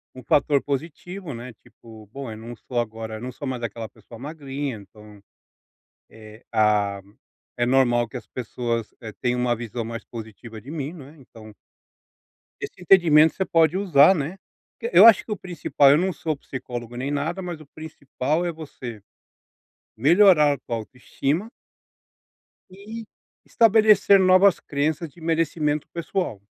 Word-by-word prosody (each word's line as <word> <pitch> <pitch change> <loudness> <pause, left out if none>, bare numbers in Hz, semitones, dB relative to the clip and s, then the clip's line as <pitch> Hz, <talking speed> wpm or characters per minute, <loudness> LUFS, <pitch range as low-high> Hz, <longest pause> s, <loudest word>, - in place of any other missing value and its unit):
um 130 - -11
fator 140 +1 +2
positivo, 160 +3 -5
né, 120 +1 -9
tipo: 110 -2 -16
"Bom, 135 -2 -7
eu 110 - -8
não 115 +2 -9
sou 120 +2 -4
agora 110 -1 -4
eu - - -11
não 125 +1 -5
sou 140 +3 -7
mais 130 -2 -4
daquela 115 0 -5
pessoa 115 - -15
magrinha, 140 -1 -5
então, 105 0 -16 0.9
eh, 110 +1 -14
ah, 105 -2 +2 0.6
é 120 - +1
normal 120 -2 +2
que 130 - -9
as 125 - -8
pessoas, 115 -2 -4
eh, 110 -3 -8
tenham 125 0 0
uma 125 -1 +1
visão 115 0 -5
mais 115 0 -6
positiva 110 0 -10
de 135 +7 -10
mim." 150 -1 -4
Não 155 -7 -11
é? 150 +3 -16
Então 110 -5 -15 1.1
esse - - -8
entendimento 165 -4 +5
você 190 - -1
pode 165 0 +3
usar, 185 -3 +5
né, 160 +4 -4 0.4
porque 470 +1 -5
eu - - +10
acho 230 -2 +7
que - - -9
o 210 - -2
principal, 165 -6 +2
eu 145 - +5
não 185 +3 0
sou 160 -2 -3
psicólogo 120 -3 -7
nem 130 +3 -3
nada, 160 +6 -2
mas 175 -4 -6
o 155 - -15
principal 155 +1 -3
é 175 - -1
você 130 -8 -9 1.0
melhorar 155 - +5
a - - -5
tua 120 -2 -5
autoestima 135 - -3 1.2
e 210 +5 -9 0.4
estabelecer 215 -3 +5
novas 185 +1 +5
crenças 155 +3 -2
de 160 - -20
merecimento 160 -2 -1
pessoal. 170 - -3
140 Hz, 160 wpm, -23 LUFS, 115-165 Hz, 1.2 s, eu